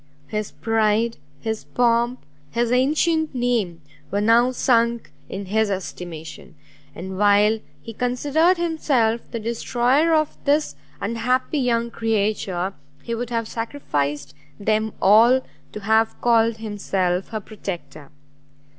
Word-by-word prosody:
His 210 -1 -3
pride, 225 0 +1 0.2
his 220 -1 -3
pomp, 240 +1 +1 0.2
his 235 0 0
ancient 305 +4 +2
name, 225 -10 -1 0.3
were 200 - -1
now 230 +4 +4
sunk 235 -2 +1 0.2
in 195 +1 -5
his 215 +2 +1
estimation; 175 -4 -6 0.4
and 190 +2 -6
while 210 +2 +4 0.2
he 230 - -8
considered 290 - +2
himself 275 -9 +1
the 230 - -4
destroyer 245 +7 +1
of 310 -1 -1
this 295 +2 +1 0.2
unhappy 250 +7 0
young 235 -2 0
creature, 205 -5 -1 0.3
he 235 - -4
would 235 +1 -3
have 230 -2 -2
sacrificed 145 - -3 0.3
them 215 +1 0
all 230 +6 +6 0.3
to 210 - -7
have 220 +2 +2
called 230 -1 +3
himself 195 -4 -1
her 220 - -4
protector. 185 -8 -8
225 Hz, 120 wpm, -22 LUFS, 205-245 Hz, 0.4 s, all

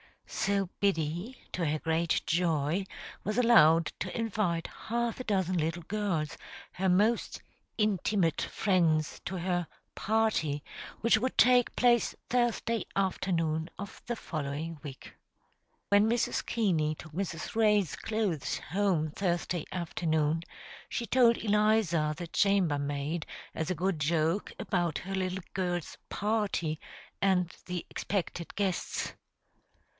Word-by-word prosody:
So 195 -2 0
Biddy, 180 - 0
to 175 - -1
her 155 0 +1
great 160 +1 +1
joy, 165 +1 +1 0.4
was 215 +2 -2
allowed 165 -10 +6
to 185 - -4
invite 205 -7 0 0.2
half 235 +1 -1
a - - -3
dozen 190 -3 +1
little 165 +2 -1
girls, 180 -6 -2 0.3
her 190 +1 0
most 210 +6 +2 0.4
"intimate" 200 -5 +1
friends, 165 -6 +1
to 190 - -3
her 175 -1 -1 0.3
"party," 205 -10 +1 0.4
which 230 -1 +5
would 255 +3 -2
take 250 -1 +5
place 240 -2 +3
Thursday 235 -2 +1
afternoon 170 -4 0
of 200 +1 -8
the 240 - -1
following 155 -3 -4
week. 140 -4 -9 0.8
When 205 +2 +5
Mrs. 235 0 +1
Keaney 165 -9 +1
took 155 - -11
Mrs. 170 -1 -4
Ray's 210 -5 +3
clothes 215 -9 -1
home 180 -4 0
Thursday 175 -1 -1
afternoon, 160 -3 0 0.5
she 235 - -2
told 235 0 +5
Eliza, 210 -8 +2
the 175 - -5
chamber 185 -5 +2
maid, 145 +3 -2 0.3
as 160 - -2
a 185 - 0
good 180 0 0
joke, 160 +4 +1
about 175 -4 0
her 195 +1 -6
little 185 -1 -2
girl's 175 -3 -2
"party" 205 -7 -1 0.4
and 185 -3 +2
the 180 -2 -3
expected 175 -3 -3
guests. 195 -3 -1
180 Hz, 120 wpm, -30 LUFS, 160-210 Hz, 0.8 s, allowed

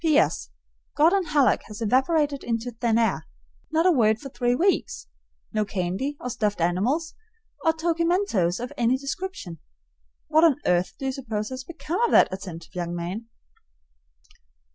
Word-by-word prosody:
S. - - -3
P.S. 300 - +2 0.5
Gordon 350 +5 +4
Hallock 295 -4 +3
has 210 0 -9
evaporated 280 +5 +1
into 230 +1 -2
thin 230 -1 0
air. 220 -8 +1 0.4
Not 320 +2 +2
a 370 - +6
word 220 -8 +3
for 275 - -8
three 245 -1 0
weeks; 345 - 0 0.5
no 215 -1 +2
candy 200 +9 -3
or 250 - -4
stuffed 210 -3 -1
animals 215 - 0 0.5
or 325 - +4
tokimentoes 330 - +1
of 245 +1 -5
any 240 +2 +2
description. 275 - -6 0.7
What 315 +2 +4
on 320 -5 +6
earth 180 0 +1
do 270 - -6
you 265 - 0
suppose 225 -6 -4
has 260 0 -6
become 340 - -4
of 475 - +3
that - - +6
attentive 175 -4 -8
young 175 -1 -3
man? 180 +7 -5
245 Hz, 155 wpm, -25 LUFS, 205-315 Hz, 0.7 s, a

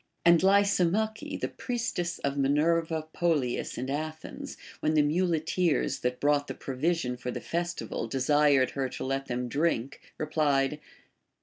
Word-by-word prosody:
And 170 -1 +7
Lysimache, 200 - +2
the - - -1
priestess 180 -8 -3
of 140 0 -2
Minerva 155 +3 +1
Polias 150 -8 0
in 130 - -3
Athens, 155 - -5 0.2
when 155 +1 +1
the 150 - +5
muleteers 165 -2 +1
that 125 0 -2
brought 145 0 +2
the - - -5
pro 135 - -6
vision 140 -3 0
for 125 0 -5
the - - -3
festival 170 -8 -3
desired 135 +1 +3
her 135 -2 -2
to - - -6
let 135 +1 -2
them 125 0 -2
drink, 140 -2 -1 0.2
replied. 150 -2 +1
150 Hz, 140 wpm, -28 LUFS, 135-170 Hz, 0.2 s, And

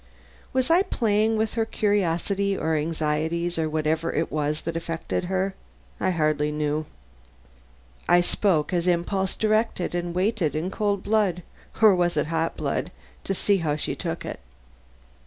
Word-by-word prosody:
Was 260 +4 +1
I 345 +3 +6
playing 220 - +1
with 220 0 0
her 230 - +1
curiosity 200 -2 0
or 160 +1 0
anxieties 160 +2 -1
or 160 -1 0
whatever 155 +1 0
it 160 - -1
was 150 0 -1
that 165 0 -4
affected 165 +1 -3
her? 190 +1 -1 0.5
I 185 - +1
hardly 155 -3 +1
knew; 150 0 -1 1.2
I 175 - +6
spoke 175 -3 +1
as 175 0 +1
impulse 185 +2 0
directed 215 -4 +1
and 175 0 -2
waited 185 -4 +1
in 170 +5 -2
cold 205 -2 0
blood 200 -5 +1 0.4
or 215 -2 +9
was 175 -2 +1
it 150 - +2
hot 165 0 0
blood? - - -2 0.4
to 195 - -1
see 200 +2 +2
how 155 -5 0
she 150 - -3
took - - -4
it. - - -5
175 Hz, 155 wpm, -25 LUFS, 160-200 Hz, 1.2 s, or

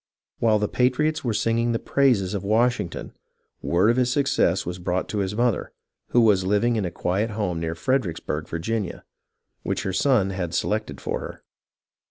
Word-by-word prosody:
While 110 -2 +3
the 105 0 0
patriots 130 +7 +1
were 120 - 0
singing 115 +2 +1
the - - +1
praises 115 -9 +2
of 100 -2 -3
Washing 115 -1 +2
ton, - - -8 0.5
word 95 +6 +3
of 120 - -1
his 125 -1 +2
success 135 -9 +1
was 90 +1 -5
brought 90 +1 -1
to 105 - -2
his 95 +1 -2
mother, 120 -1 0 0.3
who 120 - +3
was 105 -4 +4
living 105 +5 +2
in 105 -4 0
a - - -1
quiet 95 +6 -1
home 100 -6 -2
near 80 0 -3
Fredericksburg, 85 - -1
Virginia, 95 +3 -3 0.6
which - - -2
her 95 - -2
son 105 -4 +2
had 90 -3 -3
selected 105 - -1
for - - -3
her. - - -9
105 Hz, 180 wpm, -24 LUFS, 90-120 Hz, 0.6 s, was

